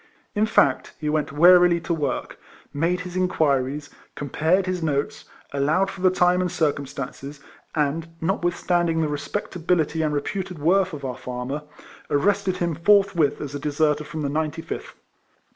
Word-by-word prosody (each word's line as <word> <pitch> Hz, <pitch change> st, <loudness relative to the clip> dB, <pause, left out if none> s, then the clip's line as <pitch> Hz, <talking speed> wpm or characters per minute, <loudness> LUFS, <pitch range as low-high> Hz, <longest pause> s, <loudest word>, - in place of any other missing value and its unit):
In 215 Hz, +1 st, +2 dB
fact, 140 Hz, -11 st, +2 dB
he 150 Hz, -, -2 dB
went 150 Hz, -1 st, 0 dB
warily 175 Hz, +3 st, +6 dB
to 170 Hz, -, -2 dB
work, 150 Hz, -3 st, -3 dB, 0.3 s
made 170 Hz, +5 st, 0 dB
his 180 Hz, 0 st, -8 dB
inquiries, 150 Hz, -6 st, 0 dB, 0.2 s
compared 160 Hz, +6 st, +1 dB
his 185 Hz, -1 st, -2 dB
notes, 145 Hz, -3 st, -2 dB, 0.3 s
allowed 155 Hz, +8 st, +1 dB
for 185 Hz, -, -10 dB
the 185 Hz, -, +5 dB
time 180 Hz, 0 st, +3 dB
and 180 Hz, -, -1 dB
circumstances, 140 Hz, -3 st, -3 dB, 0.4 s
and, 155 Hz, +2 st, 0 dB
notwith 175 Hz, 0 st, 0 dB
standing 170 Hz, -2 st, +1 dB
the 155 Hz, -, +1 dB
respectability 160 Hz, +1 st, -1 dB
and 155 Hz, -1 st, +1 dB
reputed 180 Hz, +5 st, -3 dB
worth 185 Hz, +4 st, +2 dB
of 140 Hz, -2 st, -6 dB
our 125 Hz, -1 st, -4 dB
farmer, 125 Hz, +4 st, -4 dB, 0.5 s
arrested 190 Hz, +4 st, +1 dB
him 175 Hz, -2 st, -1 dB
forthwith 185 Hz, -2 st, +3 dB
as 145 Hz, -1 st, -5 dB
a 145 Hz, -, -4 dB
deserter 150 Hz, +1 st, +1 dB
from 155 Hz, +1 st, -5 dB
the 140 Hz, -, -1 dB
Ninety 155 Hz, +2 st, -2 dB
fifth. -, -, -7 dB
160 Hz, 155 wpm, -24 LUFS, 145-180 Hz, 0.5 s, warily